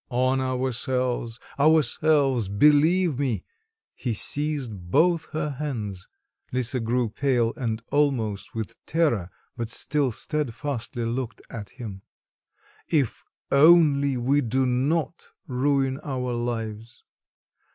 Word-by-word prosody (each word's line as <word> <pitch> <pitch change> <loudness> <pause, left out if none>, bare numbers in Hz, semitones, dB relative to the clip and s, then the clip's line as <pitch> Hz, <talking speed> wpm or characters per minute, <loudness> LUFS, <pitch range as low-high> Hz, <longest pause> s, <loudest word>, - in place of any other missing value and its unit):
"On 130 +1 +1
ourselves, 125 -2 -1 0.2
ourselves, 145 -4 +3
believe 150 - +4
me" 130 -6 -1 0.5
(he 120 -4 -3
seized 130 -10 -3
both 170 - +3
her 155 -1 -2
hands; 115 -10 -5 0.4
Lisa 130 0 0
grew 120 +1 0
pale 120 0 +1
and 115 -3 -3
almost 115 -10 0
with 110 -2 -6
terror 145 - +1 0.3
but 115 -2 -4
still 140 +2 0
steadfastly 125 -2 -3
looked 120 0 -4
at 105 -3 -7
him): 105 -6 -7 0.9
"if 145 -8 0 0.3
only 140 -3 +5
we 135 +4 +2
do 130 +2 +1
not 145 +7 -1 0.2
ruin 135 +1 0
our 125 -3 -2
lives. 115 -1 -4
130 Hz, 105 wpm, -25 LUFS, 115-145 Hz, 0.9 s, only